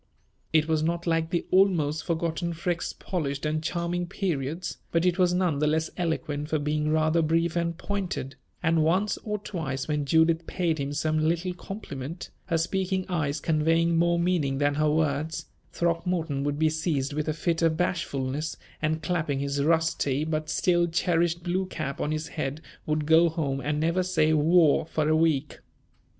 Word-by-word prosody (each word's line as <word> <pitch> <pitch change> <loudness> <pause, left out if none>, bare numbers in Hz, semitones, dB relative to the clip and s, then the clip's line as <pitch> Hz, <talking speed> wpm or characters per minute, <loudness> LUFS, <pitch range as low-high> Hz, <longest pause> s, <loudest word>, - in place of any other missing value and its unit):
It 155 -1 +3
was 160 -1 +1
not 170 +2 -1
like 165 -1 +1
the 170 0 -1
almost 170 -6 +3
forgotten 170 +1 -1
Freke's 170 +1 -2
polished 140 -6 -3
and 155 +1 0
charming 170 +2 -2
periods, 170 -3 -3
but 165 +1 +2
it 180 +1 +2
was 180 -1 +4
none 180 -5 +1
the 150 - +2
less 160 +1 0
eloquent 160 -4 -2
for 160 - +1
being 150 +1 -1
rather 155 +1 +2
brief 165 +1 +1
and 170 -1 -1
pointed; 185 -8 -3 0.3
and 165 -1 +3
once 185 +7 +2
or 210 -1 -3
twice 155 -10 -4
when 150 -1 -1
Judith 160 +2 +3
paid 165 -4 -1
him 140 0 -2
some 155 +1 0
little 170 +3 0
compliment, 170 -5 -7
her 170 -3 0
speaking 185 +2 -1
eyes 155 -4 -1
conveying 165 +2 +2
more 170 +1 +3
meaning 170 -6 +1
than 145 0 +2
her 155 +1 +2
words, 155 0 0 0.3
Throckmorton 170 -4 -1
would 145 0 -1
be 155 0 +2
seized 155 -3 -1
with 150 +1 -2
a - - +1
fit 165 +1 -1
of 165 -1 +2
bashfulness, 150 -4 -2 0.2
and 155 0 -1
clapping 160 -6 -1
his 140 0 -1
rusty 160 -3 +1
but 155 -1 -2
still 175 0 +2
cherished 170 0 +1
blue 185 +2 -1
cap 155 -6 -4
on 150 - -1
his 155 +1 -2
head 145 -1 -3 0.3
would 155 -1 0
go 165 +2 +5
home 145 -4 -2
and 150 +1 -1
never 165 +4 +1
say 160 -4 +2
"war" 155 0 +4
for 155 -1 -1
a 155 - +3
week. 155 -3 +1
160 Hz, 175 wpm, -27 LUFS, 150-170 Hz, 0.3 s, go